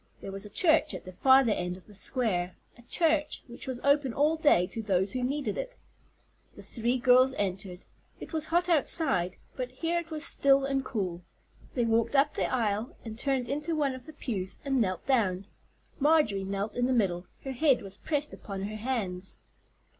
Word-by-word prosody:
There 195 - -7
was 195 +2 -4
a - - -13
church 315 - +3
at - - -7
the 185 - -8
farther 260 +3 +5
end 180 -2 -2
of 185 - -17
the 210 - -16
square, 195 -5 -1 0.2
a 240 - -17
church 310 +4 +1
which 240 +1 -11
was 255 -2 -3
open 280 -3 +2
all 300 +3 +3
day 290 - +4
to 225 - -6
those 190 -2 +1
who 255 - -2
needed 280 - -2
it. - - -5 0.8
The - - -12
three 240 +2 -1
girls 255 +1 +5
entered. 190 -2 -3 0.3
It - - -10
was 315 -1 -1
hot 350 +2 +2
outside, 275 - +2 0.2
but 255 -1 -3
here 330 +7 -1
it 335 -1 -8
was 310 -1 0
still 275 -3 +3
and 275 -1 0
cool. 185 -9 -3 0.5
They 240 -3 +1
walked 230 +3 +1
up 280 +2 +4
the - - -1
aisle, 220 -2 -1
and 220 0 -7
turned 265 -3 0
into 300 +5 -2
one 285 -3 +1
of 255 +2 -10
the 315 - -10
pews 200 -10 -4
and 270 -2 +1
knelt 185 -4 -1
down. 200 -8 +1 0.5
Marjorie 290 -10 +3
knelt 200 +2 -3
in 245 0 +1
the 260 - +1
middle; 185 -6 0 0.2
her 270 - -4
head 270 -2 +2
was 195 0 -7
pressed 295 -1 -2
upon 195 -2 -6
her 215 +2 -4
hands. 205 -6 -3
250 Hz, 195 wpm, -29 LUFS, 200-285 Hz, 0.8 s, farther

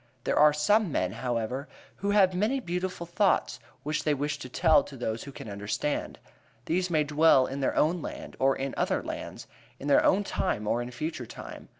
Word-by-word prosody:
There - - +1
are 150 0 +7
some 190 +6 +2
men, 90 -8 0
however, 120 +4 -3 0.3
who 200 - -2
have 200 -2 +4
many 215 +9 +1
beautiful 180 -4 -3
thoughts 195 +4 +1 0.2
which 150 +1 -2
they 150 -1 +2
wish 145 +2 -2
to 130 - -8
tell 155 +5 +4
to 135 - -10
those 110 -2 -3
who 140 - -8
can 130 - -9
understand; 105 +8 -3 0.5
these 180 +2 0
may 155 -3 +2
dwell 150 -2 +4
in 135 +2 -5
their 135 - 0
own 165 +3 +2
land - - -7
or 135 0 +3
in 135 0 -3
other - - 0
lands; - - -6 0.3
in 140 - -6
their 140 - +5
own 200 +2 +3
time 115 - -2
or 115 +3 +1
in 120 - -5
future 125 0 -5
time. - - -10
150 Hz, 200 wpm, -28 LUFS, 130-180 Hz, 0.5 s, are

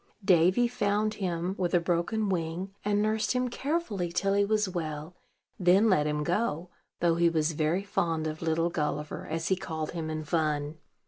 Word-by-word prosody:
Davy 185 +5 +4
found 215 -3 0
him, 180 -2 -2
with 180 -1 +1
a - - +6
broken 175 +5 0
wing, 180 +1 -2
and 205 0 +1
nursed 215 +2 +1
him 250 0 0
carefully 250 - -2
till 195 +3 +1
he 200 0 +3
was 210 0 +1
well; 160 -2 -5 0.4
then 190 +4 +5
let 150 -5 +3
him 150 0 -1
go, 175 -1 -1 0.3
though 170 -1 +4
he 170 0 +4
was 160 -1 +1
very 160 +5 0
fond 165 -5 -1
of 155 0 -4
"Little 165 +1 +1
Gulliver," 150 -2 -3
as 165 +1 -2
he 190 - +3
called 160 -4 -4
him 165 -2 -4
in 155 0 -3
fun. 150 0 -1
175 Hz, 180 wpm, -29 LUFS, 160-200 Hz, 0.4 s, a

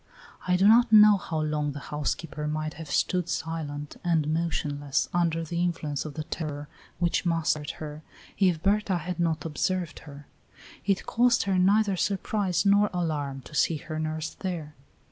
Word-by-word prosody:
I 180 - +3
do 190 +2 +4
not 235 +2 +6
know 210 -1 +8
how 160 -4 -3
long 150 -1 -1
the 145 - -6
housekeeper 150 +1 -3
might 155 0 -2
have 160 -1 -9
stood 180 -2 0
silent 150 -3 -4
and 155 -3 +1
motionless, 145 -4 -1
under 165 -1 +1
the 170 +2 -3
influence 160 -5 -2
of 150 - -7
the 155 - -3
terror 150 -2 -5 0.3
which 170 -1 +1
mastered 165 -4 0
her, 150 0 -7 0.4
if 180 -5 +2
Berta 200 -1 +2
had 175 +2 -5
not 160 -2 0
observed 170 +2 -2
her. 140 0 -11 0.6
It 195 -1 +1
caused 240 0 +3
her 195 -2 +1
neither 200 +2 +3
surprise 195 0 0
nor 200 +1 +4
alarm 150 -6 -2
to 150 - -14
see 155 +2 +2
her 155 +1 -6
nurse 155 0 -3
there. 170 -6 -5
165 Hz, 165 wpm, -27 LUFS, 150-185 Hz, 0.6 s, know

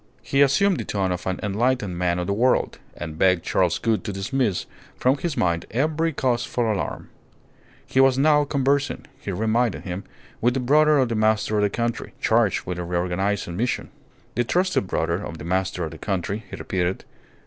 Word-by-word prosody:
He 140 - +1
assumed 175 +8 +4
the - - -2
tone 95 -3 -1
of 90 +1 -4
an 95 - -1
enlightened 105 -1 0
man 90 0 0
of 90 - -2
the 100 - 0
world, 125 +5 +1 0.2
and 80 -2 -6
begged 90 -2 +3
Charles - - +1
Gould 115 -2 0
to - - -2
dismiss 100 +1 -1 0.3
from 130 +2 +3
his 170 -5 -3
mind 85 -1 0
every 155 +7 0
cause 125 -4 0
for 120 -2 0
alarm. 105 - -3 0.8
He 130 - 0
was 135 -1 +5
now 150 +1 +4
conversing, 140 0 0
he 100 - -5
reminded 110 +3 0
him, 95 +1 -5 0.4
with 120 +2 +2
the - - +1
brother 150 +4 +4
of 130 -3 +2
the - - -1
master 110 0 +2
of - - +2
the 105 - +3
country, 115 +3 -3
charged 110 -3 +2
with 90 -1 -4
a - - -2
reorganizing 90 +2 -1
mission. 120 +6 -2 0.4
The 120 - +1
trusted 180 - +1
brother 85 +2 -1
of 80 - -6
the 75 - -8
master 95 0 -1
of 80 - -6
the 80 - -10
country, 100 +2 -3
he - - -6
repeated. 90 0 -2
110 Hz, 190 wpm, -24 LUFS, 90-130 Hz, 0.8 s, was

